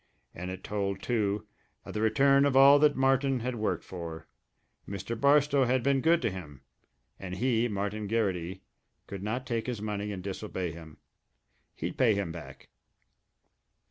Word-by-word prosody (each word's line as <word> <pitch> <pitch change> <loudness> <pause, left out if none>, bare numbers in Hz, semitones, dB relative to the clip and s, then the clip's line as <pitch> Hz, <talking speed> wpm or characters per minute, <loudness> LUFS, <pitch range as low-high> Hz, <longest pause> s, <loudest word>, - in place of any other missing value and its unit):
And 90 +2 -6
it 95 0 -7
told, 100 -2 -3
too, 105 -3 0 0.4
of - - -8
the 105 - -2
return 135 +5 +4
of 135 -2 +2
all 140 +1 +8
that 150 -1 +4
Martin 135 -1 +2
had 125 +2 -2
worked 110 -2 -2
for 85 -3 -7 0.6
Mr. 100 +4 -4
Barstow 140 +2 +4
had 125 0 +1
been 140 -1 +2
good 165 +3 +3
to - - +1
him, 75 -8 -9 0.6
and 90 -2 -6
he, 120 +2 +1
Martin 105 0 -3
Garrity, 95 -4 -1 0.4
could 100 -1 -7
not 115 +6 -3
take 115 -2 -2
his 120 -4 -3
money 105 -1 -3
and 95 -2 -6
disobey 95 -2 -4
him. 80 -2 -12 0.8
He'd - - -5
pay 120 -5 +4
him 100 -4 -2
back. 85 -1 -10
105 Hz, 160 wpm, -29 LUFS, 95-130 Hz, 0.8 s, all